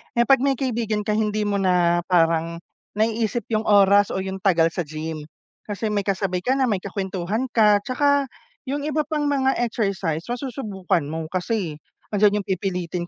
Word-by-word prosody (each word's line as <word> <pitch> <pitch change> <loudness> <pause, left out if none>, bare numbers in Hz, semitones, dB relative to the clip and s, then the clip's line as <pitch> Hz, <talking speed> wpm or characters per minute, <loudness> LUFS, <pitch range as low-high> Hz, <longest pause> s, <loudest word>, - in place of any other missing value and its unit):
eh, 235 - +4
pag 270 - +6
may 275 -1 +3
kaibigan 230 -5 -1
ka 210 - -1
hindi 215 -1 0
mo 205 -1 0
na 175 -2 +2
parang 165 -1 +1 0.3
naiisip 225 +1 0
yung 215 0 +1
oras 200 -1 +5
o 190 - -1
yung 190 0 -4
tagal 170 -4 +4
sa 175 - -2
gym, 155 0 -6 0.4
kasi 210 +1 -3
may 205 -1 0
kasabay 190 -2 -1
ka 260 - +3
na 265 -2 +2
may 205 - +1
kakwentuhan 195 +4 -3
ka, 210 -3 +4
tsaka 285 +1 +2 0.4
yung 285 +1 -2
iba 305 0 0
pang 300 -1 -1
mga 270 -2 +1
exercise 195 -9 -1
masusubukan 215 - -2
mo 160 0 -4
kasi 185 -4 -2 0.3
andiyan 205 0 +3
yung - - -45
pipilitin 180 -2 -2
205 Hz, 170 wpm, -23 LUFS, 180-235 Hz, 0.4 s, pag